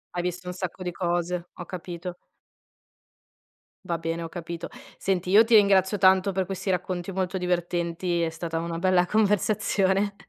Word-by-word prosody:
Hai 175 - -1
visto 180 0 -4
un 180 - -3
sacco 185 0 -5
di 180 - -2
cose, 175 0 -2
ho 175 - -8
capito. 175 0 -6 1.7
Va 170 -1 -1
bene, 165 +1 -3
ho 165 - -6
capito. 170 0 -6 0.3
Senti, 185 -2 -1
io 215 +4 +7
ti 230 -1 +4
ringrazio 200 -1 +5
tanto 190 +1 +4
per 190 -1 0
questi 195 +1 -4
racconti 180 0 -2
molto 190 0 -1
divertenti, 175 -1 -1
è 165 - +1
stata 165 0 -4
una 170 0 -3
bella 180 0 +3
conversazione, 200 -1 +1
180 Hz, 155 wpm, -26 LUFS, 170-190 Hz, 1.7 s, io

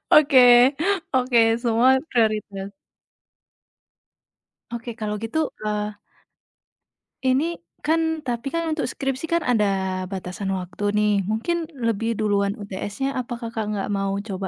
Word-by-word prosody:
Oke, 275 -5 +7 0.7
oke 250 -2 +4 0.2
semua 240 +2 +4
prioritas. 210 -4 0 2.0
Oke 235 +1 -5
kalau 210 -1 -2
gitu, 225 +8 -3 0.3
eee 210 -1 -2 1.2
ini 280 +7 +1 0.2
kan 320 0 +1
tapi 240 +1 -3
kan 335 +4 -1
untuk 310 -1 -1
skripsi 270 +1 -3
kan 335 0 +1
ada 195 -5 +1
batasan 190 +1 -4
waktu 185 +2 -6
nih, 210 0 +3 0.2
mungkin 315 +10 -1 0.2
lebih 225 +1 0
duluan 200 -1 +1
UTS-nya, 205 +6 -4
apa 245 -1 -4
Kakak 230 -2 -4
nggak 200 - -3
mau 195 -1 -1
coba, 195 -3 -4
225 Hz, 115 wpm, -23 LUFS, 200-265 Hz, 2.0 s, Oke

